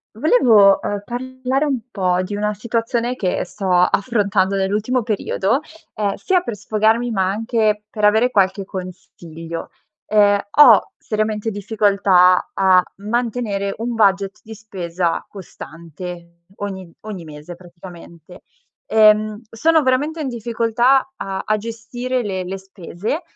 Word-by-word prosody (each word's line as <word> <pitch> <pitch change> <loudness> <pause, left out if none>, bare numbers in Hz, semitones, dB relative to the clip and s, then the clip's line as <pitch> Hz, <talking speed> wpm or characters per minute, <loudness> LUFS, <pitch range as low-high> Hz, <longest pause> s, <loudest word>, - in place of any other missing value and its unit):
Volevo, 225 - +5
uhm, 205 -1 -3
parlare 260 +3 -2
un 270 -5 -1
po' 185 -3 0
di 205 +2 -5
una 210 +1 -1
situazione 230 +2 -2
che 185 -7 -1
sto 190 +1 -5
affrontando 195 +1 +2
nell'ultimo 210 +6 0
periodo, 215 +1 0 0.3
ehm, 205 -2 -1
sia 370 -2 +1
per 235 -11 -5
sfogarmi 220 +3 +1
ma 190 -3 0
anche 215 0 0
per 210 -2 0
avere 220 +4 +3
qualche 195 -1 +1
consiglio. 170 -3 -8 0.4
Ehm, 205 -1 +4
ho 295 +7 +6
seriamente 215 0 -2
difficoltà 200 -3 +3
a 190 -1 +5 0.2
mantenere 215 -3 -2
un 235 +2 -3
budget 200 -2 +1
di 220 0 -11
spesa 180 -5 -3
costante 170 -1 -10
ogni 190 -4 -6
ogni 210 -5 -7
mese 150 +2 -10
praticamente. 175 -1 -14 0.5
Ehm, 215 -1 +4
sono 320 +7 +2
veramente 290 +5 0
in 290 - -3
difficoltà 235 +2 +1
a 195 0 -4
a 215 - +1
gestire 230 +3 -4
le 190 -3 -3
le 190 +2 -5
spese, 190 - -5
210 Hz, 125 wpm, -19 LUFS, 190-230 Hz, 0.5 s, ho